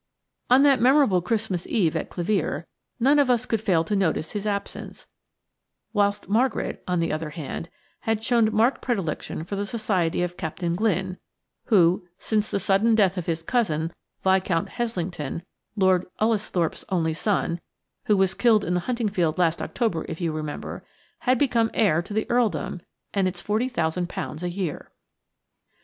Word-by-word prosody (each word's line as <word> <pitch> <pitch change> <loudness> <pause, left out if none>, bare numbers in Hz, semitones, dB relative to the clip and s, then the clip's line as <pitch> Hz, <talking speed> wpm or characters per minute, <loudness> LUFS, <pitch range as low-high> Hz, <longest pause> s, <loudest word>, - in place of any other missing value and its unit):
On 255 +3 +6
that 275 -4 +5
memorable 255 -7 +5
Christmas 195 -2 -1
Eve 175 -8 +1
at - - -2
Clevere 190 +4 -1 0.3
none 275 +5 +4
of 280 -3 +3
us 245 -1 +2
could 225 -3 -1
fail 180 -7 +2
to 205 +5 -1
notice 165 -5 0
his 210 0 -3
absence; 200 -1 -4 0.9
whilst 205 -1 +1
Margaret, 235 +7 0
on 180 -1 +1
the 165 -1 0
other 155 0 -3
hand, 160 +1 -6 0.3
had 220 -1 -1
shown 230 -2 +3
marked 225 +5 +2
predilection 185 -9 -2
for 190 +4 -5
the 200 - -1
society 195 -6 0
of 175 0 -4
Captain 170 0 -2
Glynne, 190 -2 0 0.5
who, 180 -5 +3
since 215 +1 -1
the 200 - 0
sudden 200 +4 +3
death 195 -4 +3
of 180 -3 -4
his 165 -1 -1
cousin, 165 -7 0 0.3
Viscount 190 -3 +2
Heslington, 175 - -3 0.3
Lord 185 -3 +3
Ullesthorpe's 210 -6 0
only 165 -4 +1
son 175 -2 -1 0.4
(who 210 - +3
was 190 -1 +3
killed 225 -4 +4
in 175 - 0
the 180 - +2
hunting 235 -3 0
field 175 -5 0
last 170 -2 +2
October, 220 -9 -1
if 160 - -5
you 170 -3 0
remember), 155 -1 -5 0.4
had 255 0 +2
become 235 -4 +2
heir 185 -7 +3
to 175 - -12
the 220 - +1
earldom 215 -6 0 0.3
and 195 -2 +2
its 180 -1 -5
£40,000 180 -8 -1
a 180 - -2
year. 175 -4 -4
195 Hz, 160 wpm, -25 LUFS, 170-220 Hz, 0.9 s, On